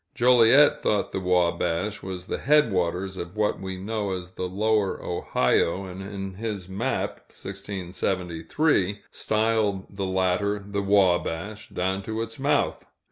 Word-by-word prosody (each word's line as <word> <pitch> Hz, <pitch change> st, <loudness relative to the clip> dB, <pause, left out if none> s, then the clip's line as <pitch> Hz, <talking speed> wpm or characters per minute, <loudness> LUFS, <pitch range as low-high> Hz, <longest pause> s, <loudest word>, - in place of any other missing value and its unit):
Joliet 125 Hz, +4 st, +6 dB
thought 105 Hz, -2 st, 0 dB
the -, -, -2 dB
Wabash 90 Hz, +2 st, +1 dB
the 95 Hz, -1 st, -5 dB
headwaters 95 Hz, -, +2 dB
of 85 Hz, +4 st, -7 dB
what 105 Hz, -1 st, 0 dB
we 95 Hz, -1 st, -4 dB
know 100 Hz, 0 st, -2 dB
as 90 Hz, -1 st, -6 dB
the 90 Hz, 0 st, -4 dB
Lower 105 Hz, +1 st, +1 dB
Ohio, 85 Hz, +3 st, 0 dB
and 95 Hz, +1 st, -8 dB
in 95 Hz, -1 st, -6 dB
his 105 Hz, -2 st, -5 dB
map 95 Hz, +1 st, -2 dB
(1673) 95 Hz, -, -2 dB
styled 110 Hz, -3 st, 0 dB
the 100 Hz, -1 st, -2 dB
latter 95 Hz, +2 st, +1 dB
the 100 Hz, 0 st, -4 dB
Wabash, 100 Hz, 0 st, +1 dB
down 95 Hz, +2 st, -1 dB
to 110 Hz, +3 st, -4 dB
its 115 Hz, +2 st, -9 dB
mouth. 140 Hz, +2 st, +1 dB
95 Hz, 130 wpm, -25 LUFS, 90-105 Hz, -, Joliet